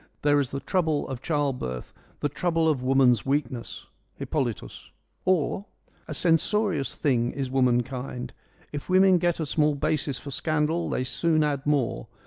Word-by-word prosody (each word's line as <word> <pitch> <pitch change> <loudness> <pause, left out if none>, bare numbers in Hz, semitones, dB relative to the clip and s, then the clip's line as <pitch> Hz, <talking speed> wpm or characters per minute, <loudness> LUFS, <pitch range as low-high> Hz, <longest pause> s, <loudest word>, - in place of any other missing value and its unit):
There 145 0 +4
is 135 -3 -1
the 140 - -4
trouble 160 -3 0
of 130 -2 -6
child 145 -5 0
birth, 65 -1 -5 0.3
the - - +2
trouble 165 +2 0
of 150 -5 +1
woman's 130 -3 +4
weakness.' 135 -3 -2 0.2
— - - -39
(Hippolytus.) 120 - -3 0.4
or 185 +2 +1
— - - -38
' - - -34
A - - -4
censorious 175 -1 +2
thing 120 -4 +1
is 135 -2 -3
womankind. 125 0 0 0.4
If 145 +3 -6
women 185 0 +5
get 175 -1 0
a 160 - -1
small 150 0 +1
basis 140 -1 -1
for 140 - -8
scandal 155 +3 0
they 125 - -1
soon 155 +4 +1
add 145 -2 -1
more. 125 - 0
145 Hz, 165 wpm, -26 LUFS, 130-160 Hz, 0.4 s, women